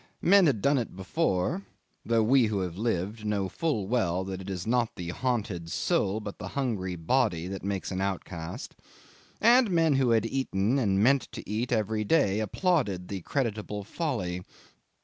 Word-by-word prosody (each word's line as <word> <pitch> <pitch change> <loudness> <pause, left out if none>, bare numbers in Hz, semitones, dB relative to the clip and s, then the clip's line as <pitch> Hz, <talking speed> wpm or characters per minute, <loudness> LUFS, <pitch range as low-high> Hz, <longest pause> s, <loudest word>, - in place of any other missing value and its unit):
Men 195 0 +6
had 115 -9 0
done 140 -1 +4
it 115 - -5
before 100 - 0 0.4
(though 115 -1 +2
we 125 +1 +4
who 105 -2 -1
have 90 -2 -3
lived 105 0 -2
know 105 -2 0
full 110 - -1
well 95 -6 +1
that 95 0 -5
it 95 - -8
is 90 -2 -4
not 120 0 +1
the 85 -1 -5
haunted 100 -6 -2
soul 95 +5 0
but 105 -2 -7
the - - -5
hungry 105 -9 -1
body 90 -1 +1
that 95 -1 -6
makes 100 -1 -3
an 95 0 -2
outcast), 95 - -4 0.6
and 240 0 +5
men 165 -4 +3
who 130 -2 +2
had 115 -1 +3
eaten 120 -1 0
and 100 -4 +2
meant 135 +3 +3
to - - -8
eat 115 +4 -2
every 110 -1 0
day 105 -5 +3
had 110 - 0
applauded 105 - 0
the 95 -2 -4
creditable 105 - -2
folly. 100 - -3
105 Hz, 175 wpm, -28 LUFS, 95-130 Hz, 0.6 s, Men